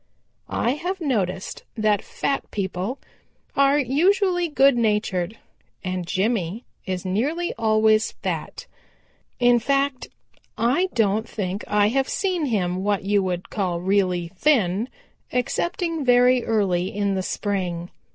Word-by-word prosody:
I 235 - +1
have 355 +7 -3
noticed 200 - -2
that 215 -2 +2
fat 275 - -3
people 195 +4 -3 0.6
are 275 +1 +4
usually 355 - +2
good 275 -3 +4
natured, 210 -4 0 0.5
and 185 -2 -3
Jimmy 200 +1 -1 0.2
is 185 -1 -3
nearly 285 - -1
always 220 -1 +3
fat. - - -5 0.7
In 245 -1 +5
fact, 275 +1 0 0.5
I 260 +12 +2
don't 220 0 +1
think 195 -1 -3
I 210 0 +3
have 270 +3 0
seen 365 -6 0
him 185 -5 -1
what 205 -1 0
you 200 +1 +2
would 180 -1 -3
call 185 -5 -1
really 180 -2 +1
thin 205 - +1 0.4
excepting 330 +5 -1
very 250 0 +4
early 190 -5 +1
in 200 0 -1
the 190 - -1
spring. 180 -3 -3
215 Hz, 120 wpm, -23 LUFS, 190-270 Hz, 0.7 s, In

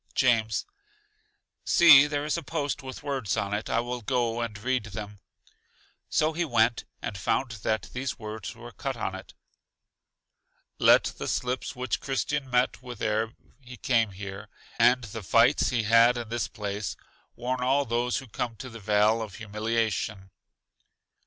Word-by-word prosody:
James: 115 -4 +2 1.0
See, 145 -4 +8
there 145 0 -2
is 150 - 0
a 170 - -2
post 145 -4 -3
with 130 +1 -8
words 135 -8 -2
on 100 +2 -1
it, 105 +1 -3
I 115 - +2
will 120 0 -4
go 120 0 0
and 110 -3 -4
read 125 +1 -1
them. 105 -1 -7 0.9
So 155 +1 +2
he 170 +2 0
went, 120 -5 +2 0.2
and 105 - -4
found 120 +6 0
that 110 +1 -1
these 130 +1 -3
words 110 -3 -7
were - - -10
cut - - -4
on - - -3
it: - - -10 1.4
Let - - +6
the - - -5
slips 125 +1 -2
which 125 0 -2
Christian 135 0 -2
met 125 0 +1
with 125 -3 -9
ere 110 +2 0 0.3
he 125 -2 -12
came 115 -3 +2
here, 100 +2 -8 0.3
and 125 +2 +5
the 110 0 -7
fights 115 +7 +4
he 120 -3 0
had 115 +3 +5
in 120 -2 -5
this 120 0 -1
place, 100 -1 -4 0.4
warn 125 +1 -2
all 135 +3 +2
those 120 +1 0
who 135 - -6
come 115 +1 -4
to 125 +4 -9
the 115 - -9
Vale 105 +2 +3
of 105 -4 -6
Humiliation. 110 -2 -2
115 Hz, 160 wpm, -27 LUFS, 110-130 Hz, 1.4 s, See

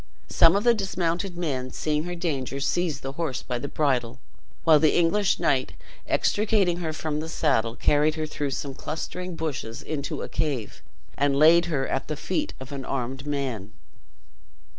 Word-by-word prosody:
Some 165 - +6
of 200 - +1
the 240 0 +6
dismounted 180 -3 -1
men, 135 -7 -2
seeing 150 +3 -1
her 175 0 -4
danger, 140 -6 -2
seized 170 +2 0
the 135 - -3
horse 145 -3 -3
by 125 -1 -3
the 140 - -4
bridle; 130 -5 0 0.5
while 160 -2 +6
the 155 -1 +4
English 185 +4 +3
knight 130 -2 +1 0.3
extricating 205 -4 +2
her 165 -3 -2
from 155 -1 -3
the 160 +1 -5
saddle, 115 -8 +1
carried 150 +3 +3
her 155 -1 -2
through 145 -2 -3
some 135 0 -4
clustering 175 +5 -5
bushes 145 -8 -4
into 145 -3 -3
a - - -4
cave, 135 -9 -3 0.3
and 140 0 +2
laid 165 +4 +6
her 145 -6 -1
at 135 - -2
the 155 - -3
feet 305 - -2
of 130 +2 -9
an 140 -2 -5
armed 135 +2 -4
man. 125 -8 -3
150 Hz, 170 wpm, -26 LUFS, 135-170 Hz, 0.5 s, Some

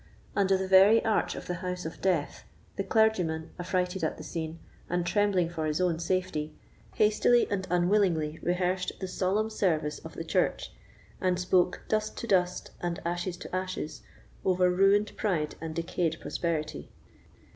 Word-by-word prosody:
Under 195 -1 +3
the 190 0 -2
very 195 +4 +6
arch 220 -1 +1
of - - -7
the 180 - -3
house 180 -2 -4
of 160 - -7
death, 175 -6 0 0.3
the 195 - -1
clergyman, 185 -7 +1
affrighted 180 0 -1
at 160 - -1
the - - -8
scene, 160 -1 -5 0.3
and 175 0 0
trembling 200 -2 +2
for 160 -2 -3
his 150 0 -1
own 175 -3 +1
safety, 170 -3 -2 0.4
hastily 215 +3 +4
and 190 -2 -1
unwillingly 175 -4 +2
rehearsed 180 +1 0
the 190 - -3
solemn 200 +4 0
service 155 -8 0
of - - -11
the - - -4
church, - - 0 0.5
and 180 -1 +1
spoke 180 0 +2
"dust 215 0 -1
to - - -4
dust 180 -5 +1
and 175 +1 -2
ashes 175 +1 -2
to - - -6
ashes," 185 -6 -4 0.4
over 180 -1 +3
ruined 195 +3 +3
pride 170 -8 0
and 160 -1 -5
decayed 165 -1 -1
prosperity. 155 - -3
180 Hz, 155 wpm, -29 LUFS, 165-195 Hz, 0.5 s, very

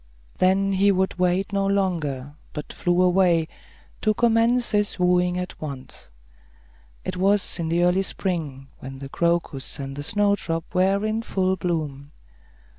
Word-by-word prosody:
Then 190 +2 +3
he 200 +1 +4
would 190 -1 0
wait 180 +2 +1
no 195 0 +1
longer, 160 -9 -1 0.2
but 150 - -6
flew 175 +1 +1
away, 180 -3 +3 0.5
to 215 -1 +2
commence 235 +1 +2
his 210 -1 +1
wooing 180 0 +2
at 180 0 -5
once. 140 - -7 1.0
It - - -3
was 195 0 +1
in 165 -1 -2
the 170 +1 +2
early 180 +2 +3
spring, 155 -9 -3
when 135 +1 -8
the 135 0 -8
crocus 170 -4 -1
and 135 -1 -6
the 145 - -5
snowdrop 200 -2 0
were 195 +3 +2
in 215 +1 -1
full 190 -4 0
bloom. 155 -5 -3
180 Hz, 145 wpm, -24 LUFS, 160-195 Hz, 1.0 s, he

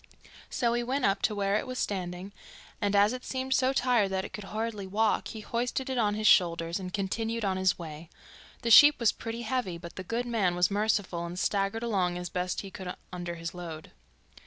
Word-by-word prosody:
So 235 -2 0
he 240 - +1
went 255 +3 -1
up 195 0 +2
to 215 - +1
where 200 0 +1
it - - -3
was 255 0 -5
standing, 185 -2 -3 0.5
and 205 0 +1
as 205 +3 +5
it 255 - -6
seemed 260 0 -2
so 260 0 +3
tired 245 -6 +2
that 190 0 -2
it - - -10
could 210 - -7
hardly 215 -1 -4
walk, 215 +3 +1
he 220 - -7
hoisted 245 +4 -2
it 260 - -2
on 210 -2 +2
his 215 0 -3
shoulders 170 -2 +4
and 185 -1 -6
continued 220 +3 -2
on 190 -1 +1
his 190 0 +2
way. 160 -1 -8 0.5
The 230 - 0
sheep 290 +4 +9
was 235 -3 +4
pretty 230 +1 -6
heavy, 225 -7 -2
but 170 0 -11
the 185 - -4
good 230 +6 -2
man 210 -7 +1
was 180 +2 +2
merciful 205 -4 0
and 170 +1 -6
staggered 200 +4 0
along 185 -6 0
as 180 0 -5
best 180 +1 -2
he 195 - -9
could 185 -2 -6 0.2
under 175 -1 -4
his 165 0 -6
load. 165 -3 -8
200 Hz, 215 wpm, -29 LUFS, 180-230 Hz, 0.5 s, sheep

